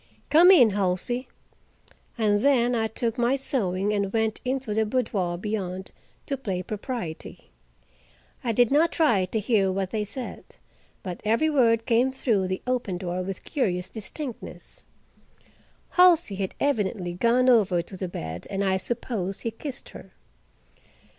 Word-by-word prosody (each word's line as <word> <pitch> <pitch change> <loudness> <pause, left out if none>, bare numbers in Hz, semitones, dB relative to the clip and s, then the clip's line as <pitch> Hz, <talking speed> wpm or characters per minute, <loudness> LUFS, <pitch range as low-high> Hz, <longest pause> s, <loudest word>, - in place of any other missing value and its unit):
"Come 335 +4 +7
in, 255 - +7
Halsey." 200 +6 -1 0.9
And 210 -2 +2
then 245 -1 +3
I 225 -2 +1
took 230 +2 -3
my 240 +3 +2
sewing 205 -7 +1
and 200 -2 -1
went 220 0 -1
into 255 -3 -2
the 220 +1 +2
boudoir 210 -7 -1
beyond, 190 -2 -4 0.3
to 275 - -3
play 190 -8 -3
propriety. 210 - -6 0.9
I 240 - 0
did 240 +2 +3
not 310 +4 +4
try 235 - +2
to 220 +4 -2
hear 205 -3 +2
what 190 0 -2
they 215 -1 -1
said, 245 +5 -8 0.5
but 180 -2 -6
every 230 +9 +2
word 230 -5 +3
came 245 +2 +2
through 225 -8 0
the 185 0 -4
open 245 -7 -1
door 180 0 -3
with 190 0 -6
curious 180 - -1
distinctness. 235 +4 -7 1.1
Halsey 350 - +5
had 195 -1 -4
evidently 205 -9 -1
gone 235 +7 +2
over 195 -8 +4
to 190 - -11
the 185 0 -4
bed 80 - -6
and 195 0 -2
I 190 -1 +2
suppose 195 -2 -3
he 230 - -2
kissed 270 +4 -8
her. - - -13
220 Hz, 145 wpm, -25 LUFS, 190-250 Hz, 1.1 s, Come